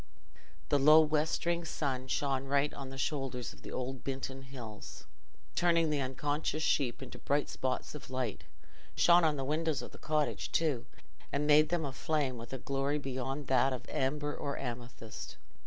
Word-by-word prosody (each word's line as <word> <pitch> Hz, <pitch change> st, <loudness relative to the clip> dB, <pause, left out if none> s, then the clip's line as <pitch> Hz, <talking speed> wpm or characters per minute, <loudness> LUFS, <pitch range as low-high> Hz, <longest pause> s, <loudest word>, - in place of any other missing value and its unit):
The 145 Hz, -, +4 dB
low 155 Hz, +3 st, +8 dB
westering 160 Hz, +3 st, +1 dB
sun 135 Hz, -5 st, -2 dB
shone 135 Hz, 0 st, 0 dB
right 140 Hz, +1 st, +2 dB
on 135 Hz, -1 st, -6 dB
the 135 Hz, -, -8 dB
shoulders 135 Hz, -4 st, -2 dB
of -, -, -17 dB
the -, -, -8 dB
old 130 Hz, 0 st, -4 dB
Binton 135 Hz, 0 st, -4 dB
Hills, 120 Hz, -5 st, -9 dB, 0.5 s
turning 170 Hz, -2 st, +3 dB
the 145 Hz, -2 st, +1 dB
unconscious 145 Hz, +4 st, -1 dB
sheep 135 Hz, -4 st, +1 dB
into 130 Hz, -, -9 dB
bright 145 Hz, +1 st, +1 dB
spots 130 Hz, -1 st, -2 dB
of 150 Hz, -, -9 dB
light; 130 Hz, -5 st, -3 dB, 0.5 s
shone 175 Hz, 0 st, +6 dB
on 155 Hz, -2 st, +3 dB
the 135 Hz, -, -2 dB
windows 155 Hz, 0 st, 0 dB
of -, -, -8 dB
the -, -, -13 dB
cottage 155 Hz, -1 st, 0 dB
too, 150 Hz, -8 st, +1 dB, 0.4 s
and 145 Hz, +1 st, 0 dB
made 150 Hz, +1 st, +6 dB
them 170 Hz, -2 st, 0 dB
a 135 Hz, -, -4 dB
flame 140 Hz, -5 st, 0 dB
with 115 Hz, -, -9 dB
a 135 Hz, -, -3 dB
glory 140 Hz, +3 st, 0 dB
beyond 135 Hz, 0 st, -3 dB
that 130 Hz, 0 st, +3 dB
of 125 Hz, -, -6 dB
amber 145 Hz, +2 st, -1 dB
or 140 Hz, -, -3 dB
amethyst. 120 Hz, -2 st, -6 dB
140 Hz, 170 wpm, -33 LUFS, 130-150 Hz, 0.5 s, low